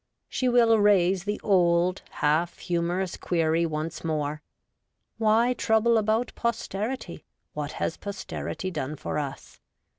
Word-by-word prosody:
She 255 - 0
will 230 -2 +5
raise 195 -2 +3
the 205 0 -2
old, 180 -1 +3
half 160 +4 0
humorous 175 +1 -1
query 165 -1 +1
once 155 +1 -4
more: 150 -2 -2 0.4
' - - -53
Why 225 +3 +3
trouble 230 -1 +2
about 220 +3 0
posterity; 225 -4 -3 0.3
what 150 0 -4
has - - -2
posterity 195 -1 -5
done 150 -3 -3
for 150 - -3
us 140 -2 -7
180 Hz, 125 wpm, -26 LUFS, 160-220 Hz, 0.4 s, will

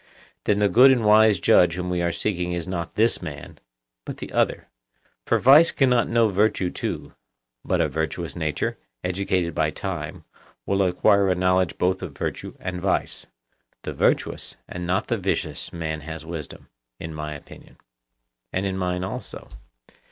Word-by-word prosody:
Then 105 - +2
the 105 0 +3
good 125 +8 +7
and 125 -4 +3
wise 105 -2 +6
judge 85 0 +4
whom 90 0 -4
we 90 -1 0
are 85 0 +1
seeking 90 -2 -2
is 85 -2 -4
not 85 -2 -4
this 115 +2 +2
man, 70 -2 -8 0.4
but - - -7
the - - -8
other; - - 0 0.6
for - - +3
vice 145 +6 +7
cannot 125 -4 +2
know 115 -1 +3
virtue 100 -2 +1
too, - - -5 0.5
but - - 0
a - - +3
virtuous 80 +1 -3
nature, 80 -3 -2 0.2
educated 90 -2 -1
by 75 0 +1
time, - - -5 0.4
will 100 0 +1
acquire 95 +2 +3
a 90 - +2
knowledge 90 -1 +1
both 95 +1 0
of 80 -7 -7
virtue - - -4
and 90 -1 -5
vice: 95 - -1 0.6
the - - -4
virtuous, - - 0
and 90 -1 -6
not 95 +5 0
the 120 - 0
vicious, 85 -6 -2
man 80 -2 -4
has 80 +1 -8
wisdom—in 75 -3 -9
my 75 -1 -5
opinion. 70 - -14 0.7
And 95 +2 -1
in 95 -1 -2
mine 90 0 -1
also. 95 - -6
90 Hz, 160 wpm, -24 LUFS, 80-100 Hz, 0.7 s, good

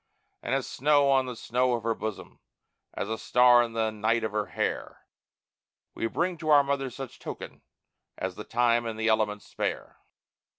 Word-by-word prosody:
And - - -1
as - - -1
snow 145 0 +3
on 135 -1 +3
the 125 - -5
snow 125 +2 0
of 115 - -5
Her 115 0 +1
bosom, 110 -2 -6 0.6
as - - -3
a 110 +1 -3
star 125 -1 +5
in 115 -1 -2
the 110 -1 0
night 110 +2 0
of 110 - -1
Her 105 -1 -1
hair, - - -3 0.9
We 115 - -2
bring 175 +7 -1
to 155 - -4
our 145 -2 +7
Mother 140 -1 -1
such 130 0 -9
token - - -8 0.6
as 95 0 -3
the 105 - -8
time 120 0 +1
and 110 -1 -5
the 110 +1 +1
elements 105 -1 +1
spare. - - -4
115 Hz, 180 wpm, -28 LUFS, 110-130 Hz, 0.9 s, our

